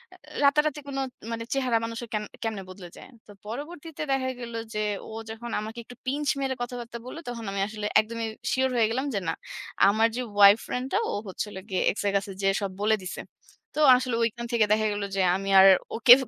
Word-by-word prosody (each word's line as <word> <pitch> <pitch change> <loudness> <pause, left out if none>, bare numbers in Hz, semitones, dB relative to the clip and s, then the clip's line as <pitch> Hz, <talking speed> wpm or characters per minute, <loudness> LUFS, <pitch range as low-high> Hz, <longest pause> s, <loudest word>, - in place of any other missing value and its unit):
আ - - -17 0.3
রাতারাতি 300 +1 +3
কোনো 270 -1 -2 0.3
মানে 230 0 -3
চেহারা 255 -4 +2
মানুষের 230 0 -6
কেন 210 0 0 0.2
কেমনে 215 -4 -3
বদলে 180 -2 -10
যায়। - - -12 0.2
তো - - -12 0.2
পরবর্তীতে 300 +5 -6
দেখা 260 -1 +1
গেল 235 -1 -7 0.2
যে 215 0 -1 0.3
ও - - -8 0.2
যখন 230 +1 -7
আমাকে 220 +2 -6
একটু 245 - -13
pinch 285 +3 -1
মেরে 265 -1 -1
কথাবার্তা 240 -1 -5
বললো, 285 +6 -7
তখন 230 -2 -6
আমি 195 0 -2
আসলে 215 -1 -6 0.2
একদমই 230 +1 -4 0.2
সিউর 260 0 +2
হয়ে 225 -2 +3
গেলাম 260 +4 -1
যে, 200 - +1
না, 165 - +1 0.6
আমার 220 +2 +4
যে 250 - -1 0.3
Y - - +8
ফ্রেন্ডটা, 260 +9 -2
ও - - -3
হচ্ছিল 200 +2 -5
গিয়ে 185 - 0
X - - -12
এর - - +2
কাছে 195 0 -4
যেয়ে 195 0 +2
সব 195 -1 -2
বলে 220 +1 +4
দিছে। 185 - -5 0.5
তো - - -2 0.2
আসলে 250 -2 -2
ঐখান 235 +1 -1
থেকে 225 -2 +4
দেখা 215 0 +2
গেল 205 - -3
যে 195 - +2
আমি 195 +1 -3
আর 195 - +9 0.3
ওকে 235 +1 +9
230 Hz, 205 wpm, -27 LUFS, 210-260 Hz, 0.6 s, আর